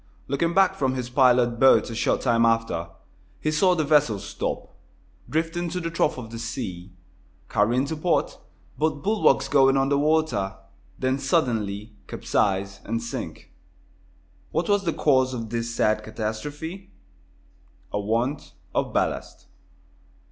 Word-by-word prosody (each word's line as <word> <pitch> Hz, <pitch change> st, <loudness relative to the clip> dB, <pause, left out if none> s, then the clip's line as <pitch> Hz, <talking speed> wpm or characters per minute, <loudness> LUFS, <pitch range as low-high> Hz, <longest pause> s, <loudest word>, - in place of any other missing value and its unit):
Looking 165 Hz, +6 st, 0 dB
back 190 Hz, -1 st, +5 dB
from 130 Hz, -1 st, -1 dB
his 125 Hz, -1 st, -4 dB
pilot 125 Hz, -2 st, +4 dB
boat 130 Hz, -2 st, +5 dB
a -, -, -5 dB
short 115 Hz, -, +1 dB
time 115 Hz, -2 st, +3 dB
after, 115 Hz, -8 st, +1 dB, 0.5 s
he 155 Hz, -, -1 dB
saw 180 Hz, +4 st, +3 dB
the 160 Hz, -, +1 dB
vessel 145 Hz, -7 st, +3 dB
stop, 100 Hz, +1 st, -5 dB, 0.6 s
drift 165 Hz, +2 st, -1 dB
into 175 Hz, +1 st, -2 dB
the 165 Hz, -1 st, -4 dB
trough 160 Hz, -3 st, +1 dB
of 115 Hz, -3 st, -8 dB
the 115 Hz, -, -6 dB
sea, 100 Hz, -6 st, -5 dB, 0.6 s
careen 120 Hz, +6 st, +2 dB
to 160 Hz, -, -3 dB
port, 165 Hz, +3 st, 0 dB, 0.4 s
both 155 Hz, -1 st, 0 dB
bulwarks 215 Hz, +1 st, +3 dB
going 135 Hz, -1 st, +4 dB
under 135 Hz, +1 st, +2 dB
water, 145 Hz, -11 st, +1 dB, 0.4 s
then 130 Hz, +1 st, 0 dB
suddenly 110 Hz, -, -1 dB
capsize 95 Hz, -1 st, -1 dB
and 115 Hz, +1 st, -3 dB
sink. 115 Hz, -, -6 dB, 1.0 s
What 165 Hz, +1 st, -1 dB
was 205 Hz, -1 st, +2 dB
the 165 Hz, -, +1 dB
cause 130 Hz, -3 st, +2 dB
of 115 Hz, -2 st, -6 dB
this 115 Hz, 0 st, -3 dB
sad 110 Hz, -1 st, +2 dB
catastrophe? 145 Hz, -, -5 dB, 1.0 s
A 105 Hz, -, 0 dB
want 115 Hz, +7 st, -1 dB, 0.2 s
of -, -, -1 dB
ballast. -, -, -2 dB
130 Hz, 140 wpm, -25 LUFS, 115-155 Hz, 1.0 s, back